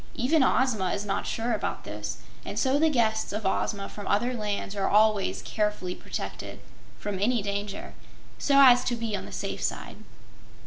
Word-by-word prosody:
Even 280 +6 +2
Ozma 245 -8 +2
is 205 - -3
not 195 - -2
sure 230 +1 -1
about 215 - -2
this, 105 +3 -5 0.3
and - - -6
so 265 +5 +2
the 320 +1 +4
guests 220 -5 +1
of 210 0 -4
Ozma 195 +1 0
from 205 - -8
other 240 +5 +1
lands 210 -3 -3
are 195 -1 0
always 215 -1 +3
carefully 210 -4 -1
protected - - -6 0.4
from 205 -2 -4
any 225 +1 +2
danger, 200 0 -4 0.5
so 280 -1 +4
as 250 -2 +8
to 245 - 0
be 230 -2 -2
on - - -5
the - - -10
safe - - -4
side. - - -3
215 Hz, 175 wpm, -27 LUFS, 200-245 Hz, 0.5 s, as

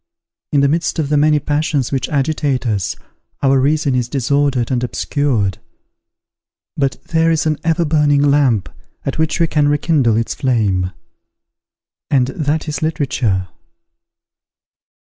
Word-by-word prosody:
In 145 - +3
the 140 - +4
midst 165 +5 0
of 155 -3 -1
the 150 - +2
many 150 +1 +4
passions 145 -2 -1
which 135 -2 -1
agitate 140 -2 0
us, 105 -5 -1 0.5
our 135 -1 +4
reason 145 +1 +1
is 125 -1 -1
disordered 140 -1 0
and 125 -1 0
obscured: 120 -7 -1 1.2
but 135 -2 -1
there 165 0 +1
is 160 -1 +1
an 155 -1 +1
everburning 150 -3 +2
lamp, 135 -9 +2 0.4
at 135 - -3
which 160 +1 0
we 170 - +4
can 150 -2 +1
rekindle 145 -6 +2
its 115 - -1
flame; 100 -8 0 1.2
and 130 -2 +2
that 150 +3 -2
is, 150 -2 -3
literature. 130 - -1
140 Hz, 130 wpm, -17 LUFS, 125-150 Hz, 1.2 s, the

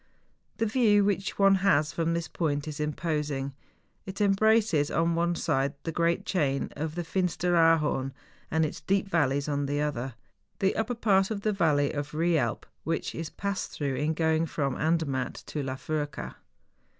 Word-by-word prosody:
The 225 - +1
view 210 -3 +4
which 195 -1 -1
one 195 -1 +6
has 155 -6 +3
from 165 0 0
this 170 -1 -2
point 145 -3 -2
is 150 -1 -5
imposing; 150 -3 -2 0.5
it 190 +2 -6
embraces, 205 -6 +3
on 165 0 +1
one 170 +1 +1
side, 140 -5 0
the 165 - -2
great 170 +1 +1
chain 140 -7 0
of 155 +1 -4
the 175 - -2
Finsteraarhorn 165 -6 +2 0.4
and 160 0 +2
its 150 - -5
deep 195 +5 +1
valleys, 145 -6 +1
on 145 -1 -1
the 145 +1 -1
other, 135 -4 -2 0.4
the 195 0 +1
upper 225 +2 -1
part 195 -4 +3
of 210 -3 -3
the 215 0 +1
valley 150 -7 +2
of 145 -1 -3
Eealp, 155 -7 +1 0.2
which 165 - -2
is 165 -1 -5
passed 200 -1 -4
through 140 -2 -2
in 150 +4 0
going 160 0 +1
from 140 -4 -1
Andermatt 155 -6 0
to 150 - -4
La 130 -1 -3
Furka. 145 +2 -4
160 Hz, 165 wpm, -28 LUFS, 145-190 Hz, 0.5 s, one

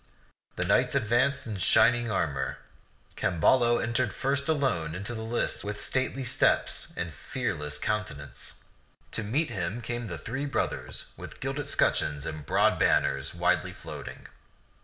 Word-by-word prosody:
The - - -1
knights - - +3
advanced 125 +5 +2
in 110 -3 -4
shining 120 +5 +4
armor. 70 -10 -1 0.6
Camballo 120 +7 +3
entered 120 -2 0
first 140 +1 0
alone 90 - +1
into 100 +6 -2
the 110 - -5
lists 115 +2 -1
with 105 0 -4
stately 130 +1 0
steps 125 - +2
and 85 -2 -3
fearless 75 - -3
countenance. 75 -7 -4 0.5
To - - 0
meet 130 +8 0
him 95 +1 -2
came 120 0 -4
the 85 -4 -5
three 135 - -4
brothers 140 - -2
with - - -9
gilded - - -3
scutcheons 75 -2 +1
and 80 -3 -6
broad - - +3
banners 70 +3 +2
widely 90 -1 +1
floating. - - -8
110 Hz, 135 wpm, -28 LUFS, 85-120 Hz, 0.6 s, shining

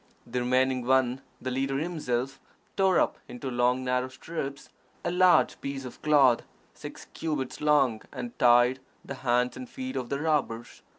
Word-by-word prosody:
The 125 +1 -3
remaining 130 0 +1
one 130 0 +2 0.2
the 130 - -4
leader 135 +1 -1
himself 135 -5 -2 0.4
tore 190 -2 +3
up - - 0
into 130 +2 -6
long 125 +1 +1
narrow 125 0 0
strips 140 0 -6 0.4
a - - 0
large 180 0 +4
piece 135 -1 -5
of 125 - -10
cloth, 140 -5 +4 0.3
six - - -10
cubits 150 -5 -3
long, 140 -7 +3
and 125 -3 -6
tied 120 +1 +5 0.3
the - - -5
hands 125 0 +1
and 255 - -8
feet 260 +1 -6
of 125 - -3
the 140 - -2
robbers. 145 -7 -1
130 Hz, 160 wpm, -28 LUFS, 125-150 Hz, 0.4 s, tied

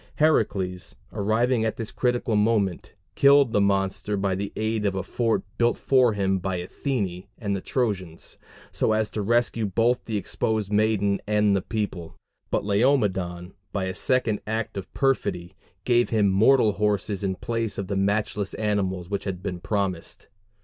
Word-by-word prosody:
Heracles, 100 - +1 0.2
arriving 110 +3 +1
at 110 +2 -1
this 115 -3 -5
critical 120 -3 0
moment, 105 -4 0 0.2
killed 140 +1 +5
the 105 - +3
monster 100 +1 0
by 100 -1 0
the 100 +2 -3
aid 110 0 -1
of 100 -2 0
a 95 - -2
fort 115 +3 0 0.2
built 120 0 +3
for 130 -4 +3
him 95 -2 0
by 95 +1 -2
Athene 95 0 -3
and 100 -4 -2
the 95 - -4
Trojans, 95 -11 -3 0.4
so 110 - +1
as 110 0 0
to 105 - -3
rescue 115 0 +1
both 115 +5 +1
the 110 -2 -2
exposed 105 0 -2
maiden 105 -2 +2
and 105 -1 +3
the 95 - +1
people; 100 -7 -4 0.3
but - - -1
Laomedon, 100 -6 +1 0.2
by 100 - -2
a 95 0 -2
second 115 0 +1
act 110 0 -2
of 100 -2 -6
perfidy, 90 -10 0 0.3
gave 120 -1 +3
him 105 -3 +3
mortal 110 +4 +4
horses 105 -1 -1
in 95 -1 0
place 115 +3 -3
of 100 - -2
the 100 +1 -3
matchless 100 0 -1
animals 95 -4 -1
which 100 +1 -3
had 95 -2 -4
been 90 -3 -4
promised. 95 -3 -3
105 Hz, 165 wpm, -25 LUFS, 95-115 Hz, 0.4 s, killed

